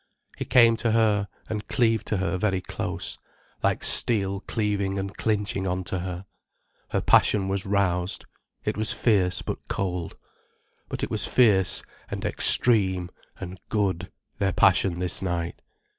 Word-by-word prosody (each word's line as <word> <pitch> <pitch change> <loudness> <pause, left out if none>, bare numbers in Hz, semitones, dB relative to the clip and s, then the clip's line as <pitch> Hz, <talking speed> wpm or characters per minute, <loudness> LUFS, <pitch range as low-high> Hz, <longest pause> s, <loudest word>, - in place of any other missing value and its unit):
He - - -5
came 115 -2 +5
to 115 -1 0
her, 105 -3 +2 0.2
and 105 -1 -4
cleaved 115 -4 +1
to 105 - 0
her 95 0 -1
very 95 0 0
close, 90 - -5 0.4
like - - 0
steel 100 -4 0
cleaving 100 -3 -1
and 95 0 -4
clinching 105 -3 -1
on 90 0 -1
to 90 +1 -3
her. 90 +1 -5 0.6
Her - - 0
passion 100 -2 +4
was 95 0 -2
roused, 95 -2 0 0.4
it - - -1
was 110 0 0
fierce 95 -6 +2
but - - -6
cold. 90 -3 -3 0.7
But - - -4
it - - -2
was - - 0
fierce, 100 -8 +3 0.3
and - - -5
extreme, 95 -7 +3 0.3
and 95 -1 -7
good, 100 -5 -1 0.3
their 95 -2 +1
passion 95 -2 +3
this 90 0 -1
night. 85 -2 -3
95 Hz, 145 wpm, -25 LUFS, 90-105 Hz, 0.7 s, came